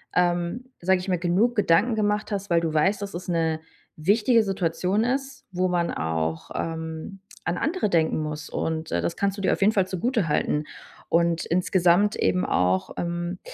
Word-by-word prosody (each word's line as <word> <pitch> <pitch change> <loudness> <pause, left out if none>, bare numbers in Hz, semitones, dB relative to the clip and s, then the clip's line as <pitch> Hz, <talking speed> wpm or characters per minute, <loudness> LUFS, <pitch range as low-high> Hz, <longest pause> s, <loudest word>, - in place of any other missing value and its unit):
ähm, 175 +6 +1
sage 185 +1 +2
ich 180 - -7
mal, 180 - +2
genug 185 +8 +1
Gedanken 210 +3 +3
gemacht 210 0 0
hast, 200 -1 -3
weil 170 -1 +4
du 165 -1 -1
weißt, 190 +7 +2
dass 200 - -6
es 180 - -6
'ne 165 -2 0 0.4
wichtige 215 +8 +3
Situation 190 +1 0
ist, 270 +1 -3
wo 185 +1 +1
man 175 -1 0
auch, 80 0 -2
ähm, 160 +3 -5 0.2
an 175 - -1
andere 315 - 0
denken 160 -3 +2
muss 150 0 -5
und, 160 0 -3
äh, 85 - 0
das 85 - -2
kannst 200 0 0
du - - -4
dir - - +2
auf - - -4
jeden 200 +2 +5
Fall 195 -3 +2
zugutehalten. 180 - 0 0.4
Und 170 0 +2
insgesamt 180 +3 +3
eben 180 - +1
auch, 90 +1 +1
ähm 175 +1 -3
180 Hz, 175 wpm, -25 LUFS, 165-205 Hz, 0.4 s, jeden